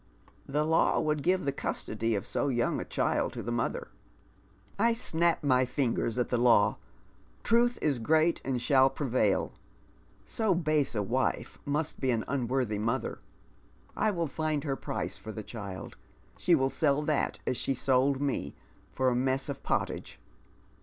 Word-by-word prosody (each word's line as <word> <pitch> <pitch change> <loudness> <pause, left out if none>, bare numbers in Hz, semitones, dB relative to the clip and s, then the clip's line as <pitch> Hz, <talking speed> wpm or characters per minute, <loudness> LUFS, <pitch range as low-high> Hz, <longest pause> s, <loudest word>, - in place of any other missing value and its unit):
" - - -29
The 150 - +3
law 160 +1 +3
wo 155 - +1
ild 150 - -4
give 185 +2 +1
the 140 - +1
custody 115 -3 -2
«£ - - +1 0.3
?ic 125 - -1
young 120 - +1
a - - -5
child - - 0
to - - -5
the 120 - -3
mother." 120 -1 -2 0.5
" 100 - -31
I - - +2
^!nap 170 -8 +1
my 130 -3 +4
fingers 125 -2 -1
at 125 - 0
the 120 - +1
law. 120 -4 +4 0.6
Trr 235 +1 +4
vh 240 - -6
is 145 -5 +1
great 160 +7 +2
and 130 -2 -1
shall 135 +1 +4
prevail. 125 -8 0 0.7
So 220 -5 +1
base 155 -6 +1
a 105 - 0
wife 125 +6 -1
must 150 +2 -2
be 130 - 0
an 115 -3 0
unworthy 125 -5 -1
mother. 115 +2 -2 0.8
I 215 - +2
will 170 -5 -1
find 155 -1 -2
her 140 -3 -1
price - - -4
for 110 - -7
the 110 0 -6
child. 100 -4 -7 0.4
She 175 - +3
will 135 -2 +1
sell 150 -1 +1
that 150 -1 0
as 125 - -1
slie 135 - -1
sold 135 +1 +2
me 135 - -2 0.2
— - - -31
for 130 -1 +2
a 125 - 0
mess 130 +2 0
of 140 -1 -5
pottage. - - -2
135 Hz, 180 wpm, -29 LUFS, 120-155 Hz, 0.8 s, my